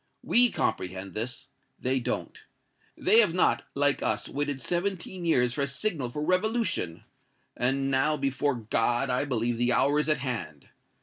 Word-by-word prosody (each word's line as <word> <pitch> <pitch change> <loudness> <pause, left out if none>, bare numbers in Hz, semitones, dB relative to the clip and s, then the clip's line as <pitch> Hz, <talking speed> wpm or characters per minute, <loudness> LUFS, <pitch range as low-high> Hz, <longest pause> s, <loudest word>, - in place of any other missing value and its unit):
We 245 +1 +4
comprehend 95 - -3
this 120 +4 -4 0.3
they 130 +1 0
don't. 120 - -4 0.5
They 215 +5 +4
have 200 -7 +4
not, 180 - +2
like 145 0 +2
us, - - -1
waited 145 -1 -2
seventeen 180 +3 -3
years 125 -7 +3
for 145 - -2
a 140 - +2
signal 140 - -2
for 150 +5 -4
revolution; 185 - 0 0.5
and 135 +2 +1
now, 135 +3 +2
before 140 0 0
God, 120 +3 0
I 125 +3 0
believe 120 -3 -1
the 120 +1 +2
hour 145 +2 +3
is 150 - 0
at 155 - +3
hand! 100 - -5
135 Hz, 160 wpm, -28 LUFS, 120-165 Hz, 0.5 s, We